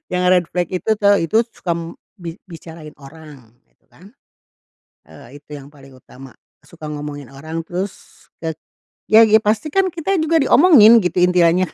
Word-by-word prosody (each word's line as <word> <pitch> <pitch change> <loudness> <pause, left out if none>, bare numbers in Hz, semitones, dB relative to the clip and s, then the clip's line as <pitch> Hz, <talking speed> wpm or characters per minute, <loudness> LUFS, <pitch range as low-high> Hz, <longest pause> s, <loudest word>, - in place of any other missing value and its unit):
yang 180 0 -1
red 180 -2 +2
flag 180 0 -3
itu 185 +4 -3
tau 205 -1 +3
itu 220 +8 0
suka 170 - -5
m 170 0 -8 0.2
bi 170 -2 -9
bicarain 160 -2 -12
orang 140 -5 -16 0.2
gitu - - -44
kan. 195 +5 -19 0.9
Eee, 145 - -15
itu 145 - -56
yang 140 0 -13
paling 135 -2 -18
utama, 130 +1 -16 0.3
suka 160 -2 -13
ngomongin 145 -2 -8
orang, 160 +4 -7
terus 185 +3 -5 0.5
ke 160 -1 -4 0.6
ya 220 +1 +6
ya 220 0 +4
pasti 215 +8 -1
kan 385 0 +2
kita 355 +3 -2
juga 325 +1 +1
diomongin, 255 - +6
gitu 180 0 -2
intiannya, 180 0 +2
175 Hz, 165 wpm, -18 LUFS, 150-210 Hz, 0.9 s, ya